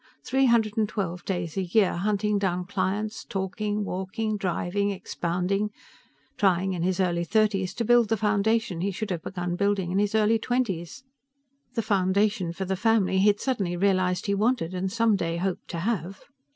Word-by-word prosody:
Three 265 0 +2
hundred 225 -2 +2
and 215 -1 +2
twelve 180 -4 -3
days 175 -3 -3
a - - +2
year, 190 +2 +2
hunting 205 +2 0
down 180 -2 -1
clients, 205 +3 -2
talking, 205 +2 -2
walking, 200 +4 -2
driving, 200 +1 -1
expounding; 190 +1 -1 0.7
trying 190 -1 +2
in 175 - -3
his 185 +1 0
early 175 -2 +1
thirties 195 -1 +1
to 235 - -1
build 240 -1 +4
the 225 - +2
foundation 215 -2 +1
he 195 - 0
should 200 +1 -4
have 170 -3 -2
begun 175 -1 -3
building 200 -2 0
in 190 - +1
his 205 +1 +1
early 220 +1 +3
twenties 230 - -2 0.7
the 230 - 0
foundation 200 -2 +1
for 190 +3 -4
the 190 +1 -1
family 195 -2 +2
he 200 - +4
had 205 0 +3
suddenly 195 -10 -1
realized 185 -1 +1
he 200 - +1
wanted 210 -4 +1
and 185 +1 -2
someday 200 -7 +1
hoped 185 +1 -3
to - - -5
have. 195 -2 -2
195 Hz, 175 wpm, -26 LUFS, 180-215 Hz, 0.7 s, build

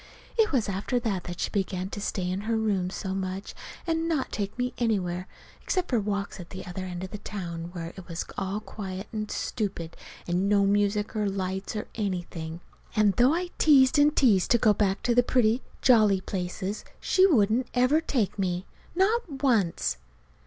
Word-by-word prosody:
It 445 -2 +3
was 255 -7 +1
after 200 +6 -1
that 200 -6 -2
that 175 -1 -6
she - - -1
began 190 -1 -2
to 205 - -5
stay 185 -2 -2
in 185 +2 -2
her 225 +2 0
room 200 -5 0
so 190 0 -4
much, 190 +1 -4 0.3
and 330 -1 0
not 300 -5 0
take 200 +1 -3
me 250 0 -1
anywhere 185 -6 0 0.3
except 370 -1 -1
for 240 - +3
walks 200 -1 -3
at 175 - -9
the 185 - -7
other 185 +1 -5
end 180 0 -5
of 185 - -6
the 210 - -6
town 170 -5 -5
where 170 -1 -6
it 190 -2 -10
was 165 -1 -4
all 195 +2 -2
quiet 195 -2 -6
and 215 -1 -3
stupid, 190 -7 -3 0.3
and 180 +3 +1
no 200 -1 +4
music 205 +2 +1
or 210 -2 +1
lights, 190 +1 -3
or 210 - -3
anything. 175 -5 -4 0.3
And 210 -2 +4
though 255 +6 +5
I 355 +1 -2
teased 290 -1 +6
and 295 +1 +5
teased 210 -9 +4
to 240 - +5
go 220 -2 +4
back 195 -1 0
to 240 - +2
the 245 - +6
pretty, 240 -1 +2 0.2
jolly 215 -6 +5
places, 185 +2 -4 0.2
she 375 +1 +4
wouldn't 240 - +3
ever 255 +6 +4
take 230 - -1
me; 180 -1 -1 0.3
not 380 - +1
once. 170 - +2
205 Hz, 190 wpm, -27 LUFS, 185-245 Hz, 0.3 s, teased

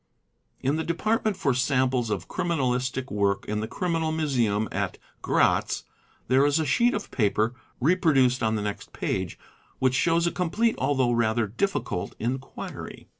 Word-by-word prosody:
In 140 +4 +1
the 160 - -1
department 215 +5 0
for 145 -8 +1
samples 130 -2 +1
of 105 - -3
criminalistic 130 -6 -1
work 100 -1 +1
in 105 0 -2
the 110 - -3
criminal 165 +2 -1
museum 120 -9 +1
at - - -2 0.2
Gratz - - +2 0.4
there 130 +2 +4
is 145 +1 +3
a 160 - +1
sheet 235 - +3
of 205 - -5
paper 110 0 +1 0.3
(reproduced 135 -5 +3
on 110 0 +1
the 105 - -2
next 105 -1 -5
page) 95 -2 -2 0.4
which 130 -1 +2
shows 165 +5 +2
a 170 - +1
complete 215 +6 +1
although 130 -4 +2
rather 115 -1 +2
difficult 110 - -2
enquiry. 130 +4 -5
130 Hz, 150 wpm, -26 LUFS, 115-165 Hz, 0.4 s, there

